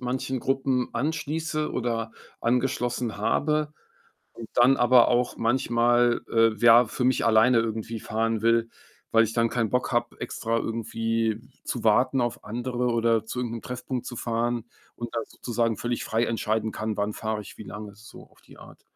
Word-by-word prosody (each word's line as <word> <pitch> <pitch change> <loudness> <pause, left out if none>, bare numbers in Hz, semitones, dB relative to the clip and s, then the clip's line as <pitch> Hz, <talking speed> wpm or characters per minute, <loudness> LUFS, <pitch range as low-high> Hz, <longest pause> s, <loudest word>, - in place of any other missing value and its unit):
manchen 130 0 -2
Gruppen 135 -2 0
anschließe 155 +2 -2
oder 115 -2 -2 0.3
angeschlossen 125 -1 0
habe 150 +7 0 0.6
und 115 -2 -10
dann 125 +3 +5
aber 120 0 +5
auch 125 0 +1
manchmal, 120 0 +2
äh, 115 -1 +4
ja, 120 +1 +7
für 125 +3 -4
mich 130 -1 +2
alleine 115 +2 +5
irgendwie 115 0 -3
fahren 110 +1 -1
will, 115 0 +3 0.4
weil 115 0 +5
ich 115 0 -3
dann 115 -1 +2
keinen 115 -3 0
Bock 125 0 0
habe, 120 0 -1
extra 115 0 -2
irgendwie 115 -1 -1 0.2
zu 120 - -4
warten 125 +4 +3
auf 120 -1 -2
andere 125 +2 -2
oder 115 -1 +2
zu 110 - -6
irgend 120 -2 -2
'nem 115 - -5
Treffpunkt 125 0 -5
zu 120 - -6
fahren 120 0 -1 0.3
und 120 -1 -7
da 115 - 0
sozusagen 115 -2 -2
völlig 120 0 -2
frei 115 +1 0
entscheiden 110 -1 -1
kann, 110 0 -4
wann 105 +1 -1
fahre 110 -1 -3
ich 105 - -13
wie - - -6
lange 105 0 -8
so 105 +3 -14
auf - - -23
die - - -18
Art. - - -15
115 Hz, 170 wpm, -26 LUFS, 115-125 Hz, 0.6 s, ja